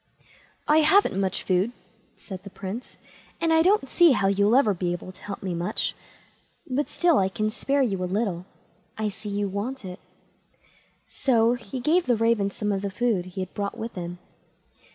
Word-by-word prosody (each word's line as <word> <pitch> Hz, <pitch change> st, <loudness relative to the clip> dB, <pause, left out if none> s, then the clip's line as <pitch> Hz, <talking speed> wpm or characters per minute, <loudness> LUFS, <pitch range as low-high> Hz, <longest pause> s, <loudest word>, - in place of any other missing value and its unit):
"I 300 Hz, +1 st, +5 dB
haven't 315 Hz, -, +4 dB
much 190 Hz, -1 st, -1 dB
food", 190 Hz, +5 st, +1 dB, 0.4 s
said 190 Hz, -3 st, -9 dB
the 200 Hz, -, -10 dB
Prince, 200 Hz, +5 st, -7 dB, 0.4 s
"and 330 Hz, -1 st, +2 dB
I 320 Hz, -, +5 dB
don't 375 Hz, -4 st, +3 dB
see 340 Hz, +1 st, +5 dB
how 205 Hz, -, +1 dB
you'll 200 Hz, +3 st, +3 dB
ever 235 Hz, -6 st, +4 dB
be 175 Hz, -1 st, -1 dB
able 175 Hz, +1 st, -7 dB
to -, -, -12 dB
help 200 Hz, -1 st, -6 dB
me 185 Hz, -2 st, -2 dB
much; 170 Hz, +1 st, -1 dB, 0.7 s
but 275 Hz, +3 st, -1 dB
still 345 Hz, -4 st, +3 dB
I 190 Hz, -1 st, +2 dB
can 215 Hz, +2 st, -1 dB
spare 275 Hz, +4 st, +1 dB
you 195 Hz, -7 st, -1 dB
a -, -, 0 dB
little. 185 Hz, -2 st, -2 dB, 0.5 s
I 215 Hz, -1 st, -1 dB
see 210 Hz, +1 st, -8 dB
you 200 Hz, 0 st, -1 dB
want 205 Hz, +5 st, -4 dB
it." 180 Hz, 0 st, -7 dB, 1.1 s
So 235 Hz, -3 st, +2 dB
he 245 Hz, 0 st, -6 dB
gave 320 Hz, +7 st, +2 dB
the 240 Hz, -2 st, +3 dB
raven 225 Hz, -3 st, +2 dB
some 210 Hz, +1 st, -2 dB
of 195 Hz, -1 st, -1 dB
the 200 Hz, -, -2 dB
food 205 Hz, -3 st, 0 dB
he 185 Hz, +1 st, -5 dB
had 185 Hz, -, -6 dB
brought 200 Hz, +3 st, -3 dB
with 230 Hz, 0 st, -5 dB
him. 175 Hz, -1 st, -6 dB
210 Hz, 190 wpm, -25 LUFS, 190-255 Hz, 1.1 s, I